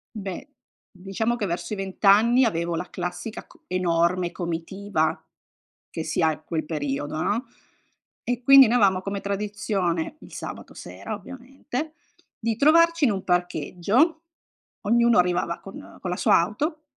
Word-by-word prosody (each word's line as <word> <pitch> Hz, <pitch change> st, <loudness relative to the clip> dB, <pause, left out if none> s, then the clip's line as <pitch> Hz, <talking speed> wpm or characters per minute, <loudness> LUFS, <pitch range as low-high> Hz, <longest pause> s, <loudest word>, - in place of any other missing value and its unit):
Beh, 195 Hz, -, -6 dB, 0.4 s
diciamo 195 Hz, +5 st, -2 dB
che 215 Hz, -4 st, -2 dB
verso 180 Hz, +4 st, -3 dB
i -, -, -1 dB
20 195 Hz, 0 st, -7 dB
anni 230 Hz, +6 st, +6 dB
avevo 170 Hz, -6 st, 0 dB
la 180 Hz, +2 st, -4 dB
classica 180 Hz, +5 st, -5 dB
co -, -, -22 dB
enorme 175 Hz, 0 st, +1 dB
comitiva 170 Hz, -1 st, -2 dB, 0.7 s
che 160 Hz, -, -4 dB
si 155 Hz, -, -1 dB
ha 160 Hz, -1 st, +2 dB
quel 160 Hz, -1 st, -3 dB
periodo, 145 Hz, 0 st, -3 dB
no, 230 Hz, +6 st, 0 dB, 0.8 s
e 245 Hz, 0 st, -2 dB
quindi 275 Hz, -1 st, +9 dB
noi 245 Hz, +2 st, +3 dB
avevamo 190 Hz, -4 st, +3 dB
come 200 Hz, 0 st, -4 dB
tradizione, 200 Hz, -, -2 dB
il -, -, -14 dB
sabato -, -, -8 dB
sera -, -, -8 dB
ovviamente, 270 Hz, +3 st, -7 dB, 0.5 s
di 230 Hz, -1 st, -1 dB
trovarci 335 Hz, +4 st, +4 dB
in 235 Hz, -, +3 dB
un 195 Hz, -2 st, -3 dB
parcheggio, 180 Hz, -, +1 dB, 0.6 s
ognuno 235 Hz, -1 st, +4 dB
arrivava 175 Hz, -1 st, 0 dB
con 195 Hz, -, -11 dB
con 185 Hz, -, -4 dB
la 180 Hz, -, -1 dB
sua -, -, +4 dB
auto 300 Hz, -, -2 dB
195 Hz, 145 wpm, -24 LUFS, 175-235 Hz, 0.8 s, quindi